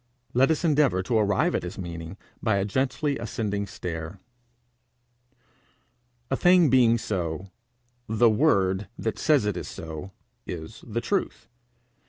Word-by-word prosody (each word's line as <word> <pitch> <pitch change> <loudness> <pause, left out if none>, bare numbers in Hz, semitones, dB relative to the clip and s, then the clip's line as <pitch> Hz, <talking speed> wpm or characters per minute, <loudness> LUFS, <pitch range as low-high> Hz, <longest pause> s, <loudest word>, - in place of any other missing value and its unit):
Let 130 +2 +4
us 160 +1 +1
endeavour 145 - +3
to 110 +3 +1
arrive 100 -2 +2
at - - 0
his 90 +3 -7
meaning 85 0 -7 0.2
by 110 -3 +2
a 100 0 +1
gently 135 +5 -1
ascending 105 -3 -3
stair. 85 0 -6 2.1
A - - +3
thing 175 -2 +5
being 120 -3 +5
so, 90 -3 -3 0.6
the 110 +2 +4
word 100 -6 +2
that 110 - -3
says 150 -8 +3
it 105 -3 0
is - - -5
so, 80 +1 -7 0.4
is 85 +4 -7
the 115 +1 -2
truth. 200 +9 -2
105 Hz, 135 wpm, -26 LUFS, 95-130 Hz, 2.1 s, thing